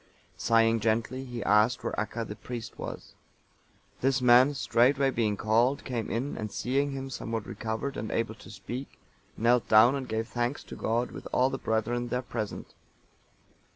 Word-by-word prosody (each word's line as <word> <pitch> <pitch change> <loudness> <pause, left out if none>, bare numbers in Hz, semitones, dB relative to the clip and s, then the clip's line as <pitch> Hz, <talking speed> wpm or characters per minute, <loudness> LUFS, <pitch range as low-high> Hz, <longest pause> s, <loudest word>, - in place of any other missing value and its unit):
Sighing 115 0 +3
gently, 115 +4 0
he 120 -3 -5
asked 105 +3 +3
where - - -2
Acca,(927) 110 +1 -3
the 105 - -5
priest, 120 -3 -7
was. - - -7 0.9
This 135 0 +2
man, 125 +3 +6
straightway 135 +2 +3
being 110 -4 0
called, 115 +6 +2
came 120 -4 -3
in, 125 +5 -2
and 105 -1 -4
seeing 140 +5 0
him 135 0 -5
somewhat 115 -3 -4
recovered 115 +5 -4
and 110 +1 -4
able 115 -1 -1
to 110 - -14
speak, 120 +6 -7 0.4
knelt 120 +2 +3
down, 110 +4 +7
and 135 -2 -4
gave 110 +1 -2
thanks 120 +3 -2
to - - -9
God, 120 +2 -1
with - - -8
all 130 +1 +3
the 135 - -3
brethren 115 +2 -1
there 125 +2 -2
present. 110 -4 -5
120 Hz, 165 wpm, -28 LUFS, 110-130 Hz, 0.9 s, down